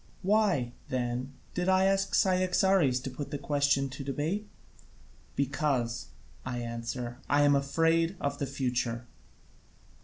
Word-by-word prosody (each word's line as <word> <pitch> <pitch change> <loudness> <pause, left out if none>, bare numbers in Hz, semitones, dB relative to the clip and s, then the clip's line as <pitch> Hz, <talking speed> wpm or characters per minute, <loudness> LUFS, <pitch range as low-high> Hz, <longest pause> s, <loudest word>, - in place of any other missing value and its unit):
Why, 195 - +2 0.2
then, 125 +1 -2 0.2
did 180 +1 0
I 190 0 +4
ask 195 0 +2
Cyaxares 185 -6 +3
to 135 - -5
put 140 +2 -6
the 145 - -3
question 140 -1 +1
to 135 +2 -7
debate? 155 +10 -2 0.9
Because, 135 -4 0 0.4
I 125 -1 -4
answer, 120 +1 -4
I 145 0 +4
am 145 0 +5
afraid 165 +5 +2
of 140 0 -2
the 140 - -1
future. 125 -3 -2
140 Hz, 125 wpm, -30 LUFS, 125-165 Hz, 0.9 s, am